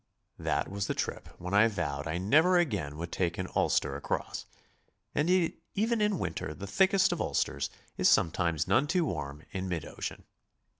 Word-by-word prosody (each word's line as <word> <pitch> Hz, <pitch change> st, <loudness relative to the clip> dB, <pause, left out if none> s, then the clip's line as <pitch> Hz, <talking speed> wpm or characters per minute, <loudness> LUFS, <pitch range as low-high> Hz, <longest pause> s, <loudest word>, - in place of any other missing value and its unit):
That -, -, 0 dB
was 100 Hz, 0 st, -3 dB
the -, -, -1 dB
trip -, -, -3 dB
when 90 Hz, +2 st, -6 dB
I 105 Hz, +3 st, +6 dB
vowed 80 Hz, -8 st, -3 dB
I 80 Hz, +2 st, -1 dB
never 155 Hz, -, +4 dB
again 100 Hz, -, 0 dB
would 85 Hz, +1 st, -5 dB
take 85 Hz, -2 st, -1 dB
an 95 Hz, -, -2 dB
ulster 70 Hz, -, +2 dB
across, 70 Hz, -, -3 dB, 0.7 s
and 150 Hz, +4 st, +1 dB
yet 180 Hz, -2 st, +3 dB, 0.2 s
even 225 Hz, +2 st, +1 dB
in 210 Hz, 0 st, +3 dB
August 85 Hz, -, -3 dB
the 100 Hz, -, -6 dB
thickest 190 Hz, -, +3 dB
of -, -, -1 dB
ulsters -, -, 0 dB, 0.3 s
is -, -, +5 dB
sometimes 85 Hz, -1 st, +2 dB
none 130 Hz, +5 st, +3 dB
too 180 Hz, +1 st, +2 dB
warm 75 Hz, -, -4 dB
in 95 Hz, -1 st, -3 dB
mid 85 Hz, -3 st, -2 dB
ocean. -, -, -6 dB
95 Hz, 180 wpm, -30 LUFS, -, 0.7 s, I